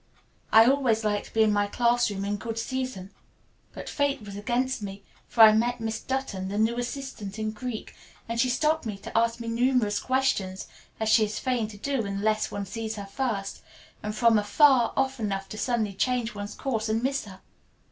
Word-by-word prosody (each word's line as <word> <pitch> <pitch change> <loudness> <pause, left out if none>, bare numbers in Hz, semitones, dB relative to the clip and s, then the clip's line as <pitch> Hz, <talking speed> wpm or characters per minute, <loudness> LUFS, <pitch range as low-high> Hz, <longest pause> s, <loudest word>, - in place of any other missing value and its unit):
I 225 +1 +8
always 250 -4 +2
like 205 -1 0
to - - -14
be 220 - +5
in 215 -1 +3
my 205 0 +2
classroom 235 -3 +1
in 205 +1 -1
good 225 +2 -5
season. 255 -6 -4 0.6
But - - -9
fate 285 -1 0
was 200 -1 -8
against 240 +4 -1
me, 200 0 -7 0.2
for 230 - +2
I 220 -1 +11
met 240 +3 +1
Miss 225 -1 -3
Dutton, 260 -8 -3
that 200 +2 -3
new 225 +3 +1
assistant 245 -5 -5
in 215 0 -2
Greek, 220 +1 -6 0.3
and 230 0 -3
she 255 - +2
stopped 310 +5 +1
me 210 -2 -4
to 195 - -10
ask 230 +1 +2
me 230 - -6
numerous 230 -3 +1
questions, 255 -8 0 0.3
as 220 - -1
she 220 0 +5
is 210 0 -5
fain 250 -4 -1
to 210 -1 -11
do 270 +2 -1
unless 210 +2 0
one 200 -1 -4
sees 220 +2 -4
her 205 -2 -6
first, 200 -2 -3 0.4
and 210 0 -4
from 230 -1 +4
afar 245 +3 +4
off 270 -1 0
enough 195 -3 -2
to 215 - -7
suddenly 225 -5 0
change 240 +2 0
one's 205 0 -6
course 225 -5 -2
and 225 +2 0
miss 270 -1 0
her. 190 -2 -12
225 Hz, 200 wpm, -27 LUFS, 205-250 Hz, 0.6 s, I